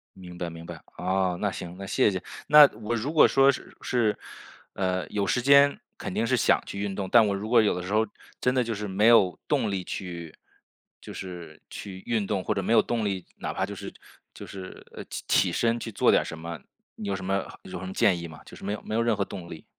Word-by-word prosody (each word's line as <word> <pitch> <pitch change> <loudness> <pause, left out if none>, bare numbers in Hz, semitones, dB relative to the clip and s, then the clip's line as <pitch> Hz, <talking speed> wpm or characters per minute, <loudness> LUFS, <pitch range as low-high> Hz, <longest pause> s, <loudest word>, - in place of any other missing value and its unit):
明 90 -2 -11
白 85 -1 -3
明 85 0 -10
白。 - - -9 0.2
哦， 95 -1 0
那 105 - 0
行， 90 -1 -7
那 100 - -7
谢 100 +2 +2
谢。 95 -2 -3 0.3
那 150 -1 +9
我 115 +2 -1
如 125 +7 -3
果 155 - +7
说 135 0 +5
是 135 - -9
是， 110 -4 +1 0.6
呃， 95 -1 -1
有 100 -1 -1
时 125 - +1
间 140 +2 +5 0.2
肯 - - -5
定 - - 0
是 - - +3
想 - - +3
去 100 - -6
运 100 -1 -2
动， 95 -2 -4
但 115 -2 +6
我 100 - 0
如 100 +2 -5
果 120 -1 +6
有 105 - +2
的 90 - -6
时 100 - -4
候 110 +1 +3 0.3
真 125 - +1
的 130 -1 +2
就 115 -1 -3
是 105 0 -4
没 100 +3 +2
有 105 -6 +5
动 125 -8 +1
力 95 -2 -2
去 85 -3 -6 0.7
就 - - -10
是 90 -3 -8
去 95 -2 -8
运 110 -4 0
动 95 -2 -1
或 - - 0
者 95 - -1
没 95 - 0
有 110 - +7
动 115 -1 -2
力 95 -3 -2
哪 - - -4
怕 - - -1
就 - - -7
是 - - -8 0.4
就 - - -9
是 95 -1 -10
呃， - - -7 0.2
起 90 - +3
身 115 +5 +1
去 115 - -6
做 - - +3
点 - - +4
儿 - - -6
什 80 - -7
么， 85 0 -6 0.4
你 105 - -6
有 100 - -1
什 95 - -6
么 95 +1 -1 0.2
有 90 -1 -7
什 95 - -7
么 95 - -6
建 100 -6 +3
议 85 - -6
吗？ 80 -2 -12
就 - - -12
是 - - -14
没 100 - -1
有 105 - -5
没 110 - -4
有 115 - +2
任 115 -1 +2
何 100 - 0
动 85 -3 -8
力。 80 -2 -9
100 Hz, 275 characters per minute, -26 LUFS, 90-115 Hz, 0.7 s, 那